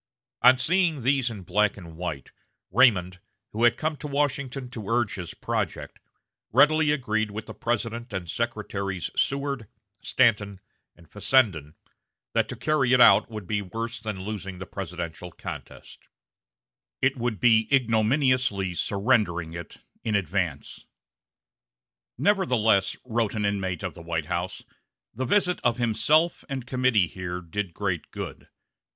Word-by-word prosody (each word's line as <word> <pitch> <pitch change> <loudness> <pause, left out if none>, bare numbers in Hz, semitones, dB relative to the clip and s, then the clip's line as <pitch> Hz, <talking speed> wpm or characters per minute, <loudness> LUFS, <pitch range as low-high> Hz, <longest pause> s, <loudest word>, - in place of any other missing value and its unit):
On 130 +1 +7
seeing 160 0 +1
these 130 -1 +2
in 105 -5 -8
black 105 +4 +1
and 85 -4 -11
white, 80 -5 -5 0.4
Raymond, 95 -5 +4 0.3
who 115 +3 +1
had 120 - +4
come 155 0 -1
to 150 - -6
Washington 140 -2 -1
to 110 -6 -7
urge 115 -3 +1
his 90 -3 -6
project, - - -3 0.5
readily 155 +1 +5
agreed 110 -7 0
with 105 +2 -6
the - - -8
President 115 +1 -3
and 95 -3 -4
Secretaries 100 -4 -3
Seward, 140 -4 -1 0.3
Stanton, 105 -6 +2 0.4
and 85 -1 -19
Fessenden, 95 - +1 0.6
that - - +1
to - - -5
carry 135 -5 +1
it 125 - +5
out 100 -4 +7
would 105 -3 -7
be 105 +3 -1
worse 115 +5 -5
than 110 -4 -5
losing 95 -2 -5
the 95 - -7
presidential 90 -2 -6
contest: - - -9 0.9
it 135 +1 +2
would 120 -5 -2
be 110 +1 +4
ignominiously 120 -4 +2
surrendering 100 -5 0
it 85 -1 -9 0.2
in 110 -2 0
advance. 90 -6 -2 1.3
"Nevertheless," 125 - +2
wrote 115 -3 -1
an 105 -1 0
inmate 95 -4 -2
of - - -3
the - - -11
White 85 -2 -2
House, 85 +4 -3 0.5
"the 130 +4 -3
visit 180 +2 +2
of 120 -1 +2
himself 150 +8 +2
and 135 -3 -4
committee 125 -6 +2
here 90 0 -5
did 90 +2 -4
great 95 -5 -2
good. - - -7
110 Hz, 140 wpm, -26 LUFS, 95-130 Hz, 1.3 s, On